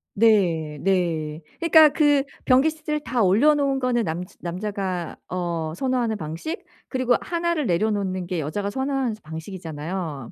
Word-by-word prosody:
네. 175 -9 +3
네. 165 -5 0 0.2
그러니까 320 -2 +7
그 290 -2 +3 0.2
변기 265 +5 +5
시트를 305 -1 -3
다 250 -5 -1
올려놓은 275 +7 +4
거는 245 -2 +1
남 165 +2 -2 0.2
남자가 185 -1 -3
어 170 -3 -3
선호하는 245 -1 0
방식 315 - -5 0.2
그리고 255 -2 +2
1 340 0 -1
를 300 -5 -1
내려놓는 185 0 0
게 180 -2 -2
여자가 195 +7 -2
선호하는 265 -2 -1
방식이잖아요. 160 - -6
200 Hz, 305 characters per minute, -24 LUFS, 170-270 Hz, 0.2 s, 그러니까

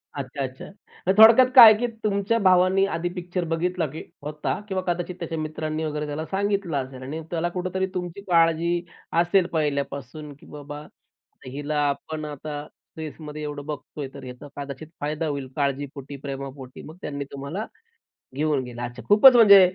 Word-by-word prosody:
अच्छा, 140 0 -5
अच्छा. 130 0 -6 0.4
तर 190 - +5
थोडक्यात 230 +4 +9
काय 245 - +13
आहे 210 - -4
की 245 - +1 0.2
तुमच्या 205 +2 +1
भावाने 185 0 +4
आधी 175 +1 -2
पिक्चर 180 0 -3
बघितला, 175 0 0
की 155 +4 -8 0.2
होता. 150 +5 -3
किंवा 190 -2 -1
कदाचित 175 +1 -2
त्याच्या 165 -1 -4
मित्रांनी 155 0 -3
वगैरे 150 0 -3
त्याला 150 +2 -4
सांगितलं 200 -5 0
असेल. 130 -1 -11
आणि 155 +5 -5
त्याला 170 0 0
कुठेतरी 185 +1 -1
तुमची 180 +1 -4
काळजी 165 0 +4 0.5
असेल 175 +1 +3
पहिल्यापासून, 145 0 -3
की - - -17
"बाबा, 145 0 -8 0.7
हिला 145 +3 -3
आपण 155 +2 -4
आता 150 0 -6 0.3
फेजमध्ये 150 0 -7
एवढं 145 -1 -5
बघतो 150 0 -7
आहे 135 - -4
तर 140 -2 -10
याचा 125 +3 -9
कदाचित 140 +2 -6
फायदा 155 +2 -2
होईल. 140 -3 -3
"काळजीपोटी, 140 0 -3
प्रेमापोटी. 135 -1 -7
मग 160 +3 -11
त्यांनी 140 -1 -4
तुम्हाला 140 +10 -5 0.7
घेऊन 150 -2 +1
गेलं. 120 -1 -8
अच्छा, 120 +1 -6
खूपच 245 +5 +8
म्हणजे 200 -4 +9
155 Hz, 160 wpm, -24 LUFS, 140-180 Hz, 0.7 s, काय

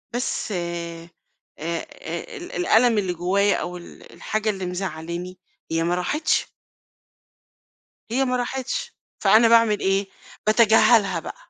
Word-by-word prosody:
بس 245 -2 -2
آآ 170 -2 -5 0.5
آآ، 165 +2 -2 0.6
ال 360 0 -9
الألم 240 -9 +3
اللي 190 -3 0
جوايا 195 +4 +2
أو 180 0 -5
ال 175 - -14
الحاجة 215 0 -2
اللي 190 -3 -3
مزعلاني 180 0 -5 0.3
هي 165 0 +1
ما 175 +1 +1
راحتش 290 - 0 1.6
هي 265 +3 +2
ما 250 -1 0
راحتش. 265 - -3 0.3
فأنا 230 +2 +6
باعمل 230 -2 +4
إيه، 195 +1 +1 0.4
باتجاهلها 215 -4 +5
بقى. - - -8
195 Hz, 120 wpm, -23 LUFS, 175-230 Hz, 1.6 s, فأنا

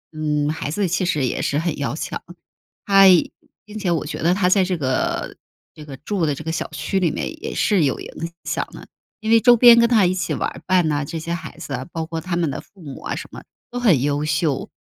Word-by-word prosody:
嗯， 150 -1 0
孩 155 -2 -4
子 195 +5 0
其 180 +2 0
实 150 -6 0
也 125 - -2
是 145 - 0
很 165 0 -1
要 140 0 -2
强， - - -5 0.6
他 195 -1 +6 0.6
并 215 0 -8
且 195 -4 -1
我 170 -2 0
觉 150 - -5
得 175 +3 +3
他 190 -2 +2
在 190 +1 +4
这 180 -1 -1
个 130 -4 -1 0.4
这 150 - -12
个 140 -2 -9
住 170 +3 -2
的 145 - 0
这 155 - -8
个 160 - -3
小 160 - -3
区 195 - -2
里 180 -3 +2
面 315 - -5
也 - - -4
是 200 -6 +2
有 135 - 0
影 165 +1 -7
响 - - -2
的， - - -11 0.3
因 220 0 -1
为 230 - +7
周 245 0 +6
边 235 0 +8
跟 235 0 +4
他 220 -5 +4
一 180 - +2
起 185 -2 -2
玩 - - -1
儿 - - -11
伴 180 -4 +3
啊， 145 0 0
这 160 +4 -5
些 165 +1 -4
孩 170 - -7
子 140 - -7
啊， 130 0 -4
包 165 -1 -3
括 165 0 -5
他 180 +1 -3
们 165 -4 0
的 - - -5
父 195 -4 -19
母 140 -3 -9
啊 - - -4
什 - - -7
么， - - -9 0.3
都 245 - -4
很 185 - +3
优 145 +1 0
秀。 150 -2 -1
165 Hz, 270 characters per minute, -21 LUFS, 150-195 Hz, 0.6 s, 边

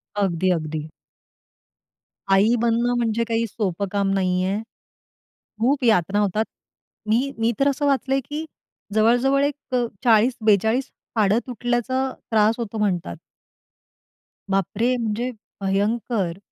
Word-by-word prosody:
अगदी, 185 -3 +1
अगदी. 155 -1 -4 1.4
आई 210 +5 +5
बनणं 235 +1 +2
म्हणजे 230 -1 +1
काही 230 0 0
सोपं 200 -2 -2
काम 200 -1 +1
नाहीये. 185 +1 +1 1.0
खूप 265 +3 +2
यातना 205 -3 +3
होतात. 210 +2 +1 0.6
मी 255 +5 +2
मी 225 +1 +2
तर 275 - +3
असं 285 +1 -1
वाचलंय 270 -1 +1
की 305 +2 -4 0.5
जवळ-जवळ 245 +5 +3
एक 285 -2 -4
अ, 245 -1 +2 0.2
40-42 220 0 +3 0.3
हाडं 210 +1 +3
तुटल्याचा 250 +2 -1 0.2
त्रास 220 +1 +4
होतो 225 -1 -4
म्हणतात. 180 - -1 1.3
बापरे! 195 +6 +1
म्हणजे 235 +2 -2 0.3
भयंकर. 200 -1 0
225 Hz, 110 wpm, -23 LUFS, 195-245 Hz, 1.4 s, आई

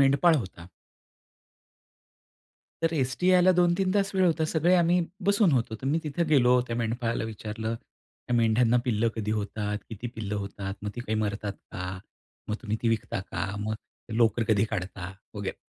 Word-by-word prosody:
मेंढपाळ 140 +5 +5
होता. 95 -7 -6 2.2
तर 165 0 +2
एसटी 135 +4 0
यायला 185 0 +6
2-3 180 +1 +3
तास 200 -1 +1
वेळ 190 -1 +3
होता. 160 -2 +2
सगळे 165 +3 +3
आम्ही 175 +1 +4 0.3
बसून 200 -4 +4
होतो. 115 -4 +1
तर 135 - -3
मी 155 +4 +2
तिथे 150 +3 0
गेलो. 125 -3 +5
त्या 115 - -3
मेंढपाळाला 115 0 -1
विचारलं, 110 +1 -4
"त्या 120 +1 -8
मेंढ्यांना 115 +1 +4
पिल्लं 115 -2 +2
कधी 105 -1 -2
होतात? 105 0 -2
किती 115 +1 -6
पिल्लं 105 -2 -4
होतात? 100 -1 -4
मग 105 - -3
ती - - -3
काही 110 -2 -2
मरतात 105 -1 -2 0.2
का? 90 - -4 0.6
मग 105 - 0
तुम्ही 110 -1 -1
ती 115 - +2
विकता 115 -4 -1
का? 90 -1 -4 0.2
मग 110 - -1 0.5
लोकर 115 0 +4
कधी 105 -1 +4
काढता?" 95 -2 -4 0.2
वगैरे. 100 -2 -4
115 Hz, 165 wpm, -27 LUFS, 105-155 Hz, 2.2 s, यायला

